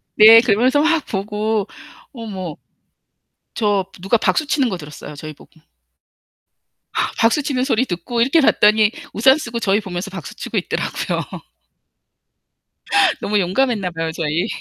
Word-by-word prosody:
네. 225 +1 +9
그러면서 250 +5 +2
막 320 -1 +1
보고 210 +1 -2 0.5
어머. 190 - -7 1.0
저 205 -3 0 0.2
누가 195 +5 +1
박수 290 +6 0
치는 275 -4 +1
거 190 - -3
들었어요. 150 -1 -10
저희 155 +2 -8
보고. 160 +2 -21 1.6
박수 230 +6 +2
치는 260 -3 -1
소리 260 -2 +1
듣고 210 +6 -3
이렇게 275 +7 +3
봤더니 215 -4 +4 0.2
우산 265 +6 +4
쓰고 235 -6 -5
저희 200 -2 +1
보면서 185 0 -5
박수 180 -7 -8
치고 - - -5
있더라고요. - - -2 2.0
너무 210 +1 0
용감했나 200 0 0
봐요, 165 -1 -3
저희. 160 +4 -2
215 Hz, 280 characters per minute, -19 LUFS, 185-245 Hz, 2.0 s, 네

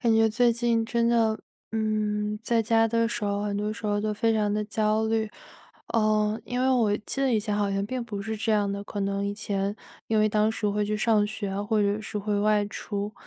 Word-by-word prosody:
感 230 -3 +3
觉 225 0 +5
最 235 +2 +3
近 230 -1 +1
真 235 0 +1
的 225 -2 +2 0.3
嗯， 210 -1 -1
在 230 0 +2
家 225 0 +3
的 230 0 +2
时 220 - -3
候 200 0 -1
很 200 -1 -2
多 210 +1 -1
时 215 -1 -6
候 205 0 +1
都 215 0 -1
非 225 +2 +1
常 210 -1 +1
地 210 0 0
焦 215 +1 +1
虑。 220 -1 0 0.6
呃， 215 -1 +2
因 245 0 -2
为 260 +1 +3
我 225 -5 +3
记 270 +5 -5
得 270 -2 +2
以 220 - +3
前 210 -1 -2
好 205 -1 +1
像 195 0 0
并 250 +2 -3
不 205 -3 -5
是 220 +1 -3
这 220 +1 0
样 205 -1 +2
的， 200 0 -4
可 205 - -5
能 200 0 -1
以 200 - -2
前 200 -1 -2 0.3
因 220 - +2
为 215 - +4
当 215 +1 +2
时 215 -1 -1
会 210 +1 0
去 210 +1 -1
上 215 -1 +3
学 210 -1 -4
啊， 195 +1 -2
或 215 +1 +1
者 205 +1 +1
是 210 0 -5
会 205 0 -1
外 210 0 +3
出。 205 0 -4
215 Hz, 260 characters per minute, -26 LUFS, 205-225 Hz, 0.6 s, 觉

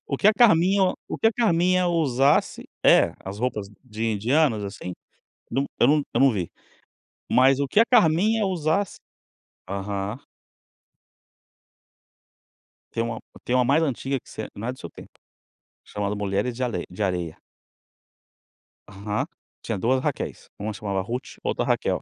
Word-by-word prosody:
O 140 - -2
que 195 - +2
a 215 - +8
Carminha 190 -4 +4
o - - -4
que - - +2
a 225 - +4
Carminha 185 -5 +2
usasse 140 -5 +2 0.2
E, - - +6
as 95 +2 -6
roupas 110 -4 -2 0.2
de 110 -2 -5
indianos, 115 +1 +1
assim 100 -2 -6 0.6
Não, 135 +3 0
eu - - +6
não 150 0 +4
eu - - +2
não 135 -1 +6
vi. 90 -6 -3 0.8
Mas 130 +2 +5
o 140 - 0
que 205 - +2
a 230 - +7
Carminha 215 -1 +3
usasse 180 +1 0 0.7
Aham. 100 +2 -3 2.7
Tem 115 - -1
uma 115 -1 -4 0.2
tem 125 - 0
uma 125 -1 +3
mais 145 +5 +3
antiga 135 -1 -1
que - - -20
você 110 - -6
não 110 +3 -5
é 125 - 0
do 130 - -16
seu - - -8
tempo, - - -13 0.7
chamado 105 0 -3
Mulheres 100 +4 -1
De 130 - -3
Alei 110 -8 -2
De 90 +4 -8
Areia. 90 -4 -2 1.5
Aham. 100 +1 -3 0.4
Tinha 110 -4 -3
2 130 +6 +2
Raquéis, - - -3
uma 105 +2 -3
chamava 100 -2 -3
Rute, 120 +6 -6
outra - - -1
Raquel. - - 0
125 Hz, 155 wpm, -24 LUFS, 105-160 Hz, 2.7 s, a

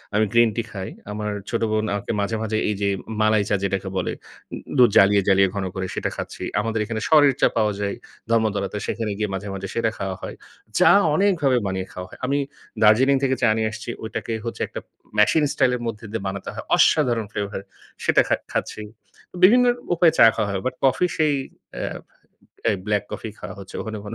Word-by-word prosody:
আমি 110 +1 +4
green 120 -1 +5
tea 115 - 0
খাই। 95 -2 -5 0.2
আমার 105 0 -3 0.2
ছোট 115 - -1
বোন 110 0 +1
আমাকে 100 +2 -3
মাঝে, 100 +3 -1
মাঝে 110 0 -1
এইযে 100 -1 -1 0.2
উম - - -4
মালাই 110 -1 +4
চা - - +3
যেটাকে 95 0 -1
বলে, 95 - -1 0.7
দুধ 125 -2 +7
জ্বালিয়ে, 100 +1 +6
জ্বালিয়ে 95 -1 +5
ঘন 100 -1 -2
করে 95 0 -2
সেটা - - -1
খাচ্ছি। - - -6 0.2
আমাদের 115 +1 -1
এখানে 110 0 -4
সরের 145 -3 +6
চা - - +6
পাওয়া 105 -2 +2
যায় 100 -1 -2 0.4
ধর্মতলাতে। 105 -3 0
সেখানে 110 -2 -2
গিয়ে 105 -1 -1
মাঝে, 100 +1 -4
মাঝে 95 0 -5
সেটা 115 -1 +1
খাওয়া 95 -1 -3
হয়। - - -6 0.4
চা - - +6 0.3
অনেকভাবে 160 -9 +2
বানিয়ে 95 -1 -2
খাওয়া 90 0 -7
হয়। - - -14
আমি 140 +2 +1 0.4
দার্জিলিং 120 +6 +5
থেকে 130 -1 +2
চা - - +4
নিয়ে 110 0 +1
আসছি। 110 +1 -8
ঐটাকে 110 +1 -4
হচ্ছে 115 - -5
একটা - - -7
উম - - -51 0.3
মেশিন 150 +9 +4
স্টাইলের 125 -2 +1
মধ্যে 115 0 -5
দিয়ে 115 - -3
বানাতে 95 0 -5
হয়। - - -6
অসাধারণ 120 -8 +3
ফ্লেভার। 100 -2 -4 0.4
সেটা - - +5
খা - - +3 0.2
খাচ্ছি। - - -3 0.6
বিভিন্ন 245 +6 +7 0.3
উপায়ে 170 -1 +4
চা - - +8
খাওয়া 105 -2 -1
হয়। 95 -1 -2
বাট 130 - 0
কফি 135 +6 +3
সেই 155 -2 +3 0.5
এ - - -3 0.9
এ - - +2
ব্ল্যাক 105 -1 +1
কফিই 110 - -6
খাওয়া 95 +1 -7
হচ্ছে। 95 -1 -11
ওখানে 110 -1 -5
কোন 105 - -6
110 Hz, 195 wpm, -23 LUFS, 100-120 Hz, 0.9 s, চা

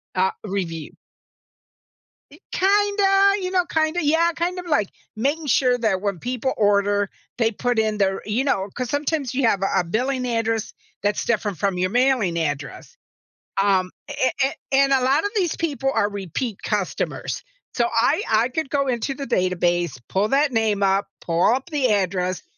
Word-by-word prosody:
uh, 190 +1 +2
review. 180 -6 -4 1.4
Y 300 - -16
kinda, 400 0 +3
you 365 - -2
know, 360 -2 +2
kinda 320 0 0
yeah, 325 +3 +3
kind 355 +2 -2
of 360 - -7
like 295 - +1 0.3
making 285 +8 -1
sure 250 -1 +3
that 215 -5 0
when 200 -4 -2
people 255 +1 -2
order, 205 -1 +2 0.3
they 225 -1 +2
put 245 +2 -1
in 215 -1 0
their 195 -1 +1
you 215 +5 0
know, 200 -8 0
'cause 250 -2 -4
sometimes 285 -3 -1
you 265 -1 +1
have 200 -4 +1
a 195 - +2
a 180 - +1
billing 250 +8 -1
address 225 -2 -1 0.3
that's 205 0 0
different 210 -5 -1
from 190 +3 0
your 185 +1 +1
mailing 245 -7 +2
address, 145 - -4 0.7
um, 190 -2 +2 0.2
a 260 - 0
a 270 - 0 0.2
and 275 0 +4
a 265 - +3
lot 275 +4 +3
of 410 - -1
these 360 -5 +1
people 280 -5 -1
are 205 - +2
repeat 200 - -4
customers, 205 -4 -2 0.3
so, 235 - +2
I 260 - +2
I 225 +2 +3
could 275 +2 -3
go 280 0 0
into 255 +2 -1
the 275 - -5
database, 175 - 0
pull 200 +3 +1
that 280 +3 +2
name 220 -3 +1
up, 195 +1 +2
pull 170 +1 0
up 265 +5 -5
the 270 -6 +1
address 185 -2 -1
230 Hz, 175 wpm, -22 LUFS, 195-280 Hz, 1.4 s, and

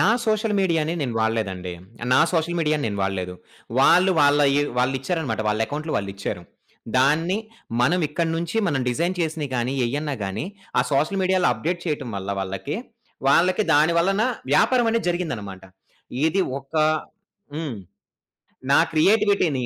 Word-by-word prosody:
నా - - +4 0.2
సోషల్ 215 0 +1
మీడియాని 165 -3 +1
నేను 125 -5 -2
వాడలేదండి. 100 -5 -2 0.4
నా - - +5
సోషల్ 170 0 0
మీడియాని 155 -2 0
నేను 100 -1 -4
వాడలేదు. 95 -2 -2 0.5
వాళ్ళు 180 +7 +5
వాళ్ళయి 145 0 +4 0.2
వాళ్ళిచ్చారన్నమాట 135 -1 -1
వాళ్ళ 105 +1 0
ఎకౌంట్‌లు 155 +2 -4
వాళ్ళిచ్చారు. 100 -2 -4 0.6
దాన్ని 160 +8 +2 0.4
మనమిక్కడి 165 +3 +1
నుంచి 170 +5 -3
మనం 140 -7 0
డిజైన్ 170 +9 0
చేసినయి 155 -3 -2
గాని, 120 +1 -1
ఏయన్నా 145 +4 -2
గాని 95 +8 -3 0.3
ఆ - - +5
సోషల్ 155 +8 +1
మీడియాలో 185 0 +2
అప్‌డేట్ 165 +10 -3
చేయటం 150 -5 -2
వల్ల 95 0 -6
వాళ్ళకి, 95 +8 -4 0.5
వాళ్ళకి 180 +8 +4
దాని 155 +3 +4
వలన 195 +5 +2 0.3
వ్యాపారం 240 - +4
అనేది 225 -5 0
జరిగిందన్నమాట. 115 - -4 0.6
ఇది 160 +5 +1 0.2
ఒక 135 +3 -19 0.8
హ్మ్. 150 -6 -4 1.0
నా - - +6
క్రియేటివిటీని 185 - +3
150 Hz, 130 wpm, -23 LUFS, 120-175 Hz, 1.0 s, నా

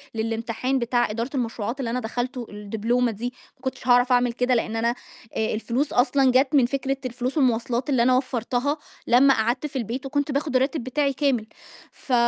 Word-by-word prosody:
للامتحان 230 +4 -1
بتاع 240 0 +1
إدارة 230 +4 -3
المشروعات 235 0 -2
اللي 250 -4 -2
أنا 250 - -1
دخلته، 245 +2 -3
الدبلومة 225 +4 -1
دي، 240 +4 -5 0.2
ما - - -30
كنتش 260 -1 -5
هاعرف 245 +1 +5
أعمل 245 -1 +3
كده، 250 +1 +1
لأن 225 -1 -1
أنا 230 +1 +1 0.5
آآ 220 - 0
الفلوس 240 +6 -1
أصلًا 265 +1 +3
جات 265 +3 +3
من 265 -4 +6
فكرة 270 +1 -1
الفلوس 255 +3 -3
والمواصلات 245 -1 +1
اللي 255 -4 +3
أنا 255 +1 +4
وفرتها 255 +2 -1 0.3
لمّا 270 +3 +6
قعدت 240 +4 0
في 285 - -17
البيت، 255 +2 -3
وكنت 285 +1 -1
باخد 280 0 -1
الراتب 265 +2 +1
بتاعي 275 +2 0
كامل، 260 -5 0 0.4
ف 260 - -6
250 Hz, 180 wpm, -24 LUFS, 235-270 Hz, 0.5 s, من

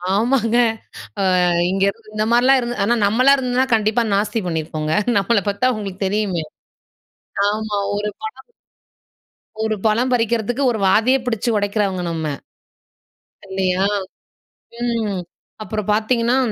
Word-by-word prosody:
ஆமாங்க. 230 +1 +1 0.9
அ - - +3 0.2
இங்க 195 +1 -1
இருந்து 215 +1 -7
இந்த 215 0 0
மாதிரிலாம் 255 +3 +5
இருந்து, 240 0 -4
ஆனா 235 - +2
நம்மளா 255 +6 +4
இருந்துன்னா, 255 0 0
கண்டிப்பா 220 +2 +2
நாஸ்தி 210 +3 0
பண்ணியிருப்போங்க. 155 -2 -3 0.2
நம்மள 205 +2 +2
பாத்த 250 +6 +1
உங்களுக்கு 195 -3 -6
தெரியுமே. 190 -5 -1 1.0
ஆமா, 210 -1 -2 0.2
ஒரு 210 +1 -2
படம் 435 +2 -8 1.1
ஒரு 220 0 0
பழம் 235 +4 +2
பறிக்கிறதுக்கு, 235 +2 0
ஒரு 220 - -3
வாதயே 225 +7 +4
பிடிச்சு 235 -1 -1
உடைக்கிறவங்க 200 -3 -1
நம்ம, 160 -1 -3 1.2
இல்லையா 190 0 0 1.0
ம். 225 -5 -1 0.4
அப்புறம் 215 -1 -4
பாத்தீங்கன்னா, 235 +3 +1
215 Hz, 115 wpm, -20 LUFS, 200-240 Hz, 1.2 s, மாதிரிலாம்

